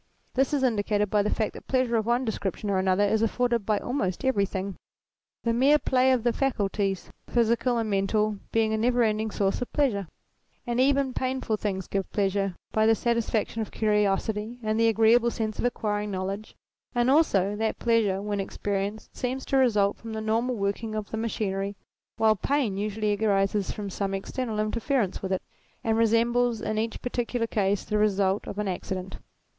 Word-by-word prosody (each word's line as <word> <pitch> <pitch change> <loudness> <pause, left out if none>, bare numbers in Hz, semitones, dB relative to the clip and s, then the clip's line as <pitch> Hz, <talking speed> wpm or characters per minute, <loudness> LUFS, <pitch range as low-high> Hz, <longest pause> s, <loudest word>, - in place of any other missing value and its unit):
This 265 0 +2
is 285 -3 +1
indicated 210 -4 +1
by 210 - +4
the 210 - 0
fact 215 0 -1
that - - -12
pleasure 255 -3 +1
of 220 -1 0
one 240 +2 +2
description 205 -2 -2
or 190 - +2
another 190 +1 +2
is 215 +2 +2
afforded 235 -1 +1
by 215 -1 +3
almost 225 -3 -2
everything, 200 -5 0 0.7
the 230 - +1
mere 270 +5 +5
play 260 -2 +2
of 250 -3 +2
the 240 -1 +2
faculties, 200 -7 -1 0.2
physical 235 +1 +2
and 225 -1 0
mental, 210 +1 +1
being 220 -1 +2
a - - +1
never 240 +2 +2
ending 220 0 0
source 195 0 0
of 245 - -4
pleasure, 225 - +1 0.6
and 240 0 -1
even 275 0 +3
painful 255 -4 -1
things 195 -3 -3
giving 195 -1 -2
pleasure 195 -2 0 0.2
by 220 0 +3
the 225 - +5
satisfaction 230 -1 0
of 215 - -4
curiosity 210 +1 0
and 215 +1 0
the 230 - +4
agreeable 225 +2 +4
sense 220 -2 -3
of - - 0
acquiring 210 -3 -1
knowledge; 195 +2 -4 0.4
and 240 +2 +3
also 205 - +3
that 220 +1 -1
pleasure, 215 -5 +1
when 205 -1 -2
experienced, 200 +2 -3
seems 260 +1 -3
to - - -1
result 210 -7 +3
from 225 -1 -8
the 220 - -3
normal 225 +3 0
working 215 +2 -2
of 215 -1 -4
the 220 - -3
machinery, 200 -3 -2 0.4
while 220 -1 +4
pain 250 -1 0
usually 210 +1 -1
arises 195 -1 +1
from 205 -1 -4
some 195 0 -2
external 220 +3 -3
interference 225 0 0
with 190 - -4
it, 190 - -1 0.4
and 225 -1 +1
resembles 230 +1 +2
in 215 - -2
each 225 0 -3
particular 245 -1 -1
case 200 -3 0
the 210 -1 -1
result 200 -1 +1
of - - -6
an 210 -1 -1
accident. 185 0 -4
215 Hz, 180 wpm, -27 LUFS, 200-235 Hz, 0.7 s, mere